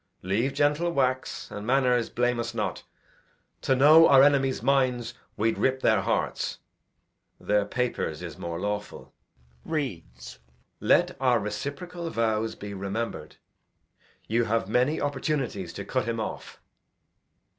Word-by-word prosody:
Leave, 105 Hz, +9 st, 0 dB
gentle 150 Hz, +4 st, +2 dB
wax; 130 Hz, -4 st, -1 dB
and, 105 Hz, +1 st, -7 dB
manners, 125 Hz, -2 st, +2 dB
blame 120 Hz, 0 st, 0 dB
us 115 Hz, -, -4 dB
not. -, -, -2 dB, 0.8 s
To 130 Hz, -, +2 dB
know 155 Hz, +5 st, +7 dB
our 135 Hz, -1 st, +8 dB
enemies' 135 Hz, -4 st, +2 dB
minds, 125 Hz, -3 st, +1 dB, 0.2 s
we'ld 110 Hz, +1 st, 0 dB
rip 130 Hz, 0 st, +1 dB
their 110 Hz, -3 st, +4 dB
hearts; -, -, -1 dB, 0.8 s
Their 105 Hz, 0 st, +1 dB
papers, 100 Hz, -8 st, -2 dB
is 85 Hz, -, -7 dB
more 85 Hz, 0 st, -5 dB
lawful. 105 Hz, +1 st, -5 dB, 0.5 s
Reads 80 Hz, -, -5 dB, 0.4 s
the -, -, -7 dB
letter. -, -, +6 dB
'Let -, -, -22 dB
our 125 Hz, -3 st, +3 dB
reciprocal 140 Hz, -, -5 dB
vows 110 Hz, -3 st, -1 dB
be 100 Hz, 0 st, -8 dB
rememb'red. 100 Hz, -4 st, -4 dB, 0.9 s
You 115 Hz, +2 st, +1 dB
have 115 Hz, -2 st, 0 dB
many 125 Hz, +8 st, +1 dB
opportunities 135 Hz, -, -2 dB
to -, -, -6 dB
cut -, -, -1 dB
him 115 Hz, -1 st, -2 dB
off. 110 Hz, -, -6 dB
120 Hz, 135 wpm, -27 LUFS, 105-135 Hz, 0.9 s, our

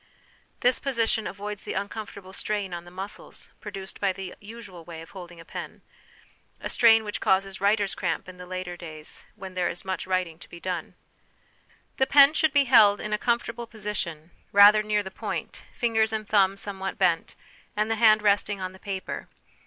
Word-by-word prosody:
This 250 Hz, +1 st, +3 dB
position 230 Hz, -4 st, 0 dB
avoids 205 Hz, 0 st, -6 dB
the -, -, -4 dB
uncomfortable 200 Hz, -2 st, -5 dB
strain 205 Hz, -2 st, -3 dB
on 170 Hz, 0 st, -6 dB
the -, -, -11 dB
muscles 190 Hz, +3 st, -8 dB
produced 190 Hz, -1 st, -8 dB
by 200 Hz, -1 st, +3 dB
the 185 Hz, -1 st, -7 dB
usual 205 Hz, -5 st, -10 dB
way 165 Hz, -1 st, -9 dB
of 165 Hz, -, -15 dB
holding 175 Hz, -3 st, -10 dB
a 165 Hz, -, -12 dB
pen -, -, -8 dB, 0.8 s
a -, -, -5 dB
strain 225 Hz, -2 st, +6 dB
which 210 Hz, -1 st, -4 dB
causes 190 Hz, 0 st, +1 dB
writer's 200 Hz, 0 st, +2 dB
cramp 170 Hz, -2 st, -2 dB
in 185 Hz, 0 st, -11 dB
later 180 Hz, 0 st, -5 dB
days 160 Hz, -3 st, -9 dB
when 190 Hz, -1 st, -8 dB
there 180 Hz, -1 st, 0 dB
is 175 Hz, -, -6 dB
much 190 Hz, 0 st, -3 dB
writing 180 Hz, -3 st, -1 dB
to -, -, -14 dB
be 170 Hz, -, -10 dB
done. 180 Hz, -2 st, -4 dB, 1.0 s
The 265 Hz, -, +3 dB
pen 280 Hz, +1 st, +7 dB
should 315 Hz, -1 st, +3 dB
be 285 Hz, 0 st, +5 dB
held 220 Hz, -6 st, +6 dB
in 215 Hz, -, -3 dB
a 210 Hz, -, +1 dB
comfortable 235 Hz, 0 st, -1 dB
position, 190 Hz, -7 st, -5 dB, 0.2 s
rather 205 Hz, +1 st, +8 dB
near 210 Hz, -1 st, 0 dB
the 190 Hz, -, -7 dB
point, -, -, -5 dB
fingers 220 Hz, -2 st, +1 dB
and 215 Hz, -1 st, -3 dB
thumb 195 Hz, -2 st, +3 dB
somewhat 195 Hz, -1 st, -4 dB
bent, 175 Hz, -4 st, +1 dB, 0.4 s
and 215 Hz, +1 st, +1 dB
the -, -, +2 dB
hand 215 Hz, -2 st, +6 dB
resting 205 Hz, -1 st, +2 dB
on 185 Hz, -1 st, -4 dB
the 190 Hz, -, -15 dB
paper. 195 Hz, -2 st, -5 dB
200 Hz, 185 wpm, -26 LUFS, 185-215 Hz, 1.0 s, rather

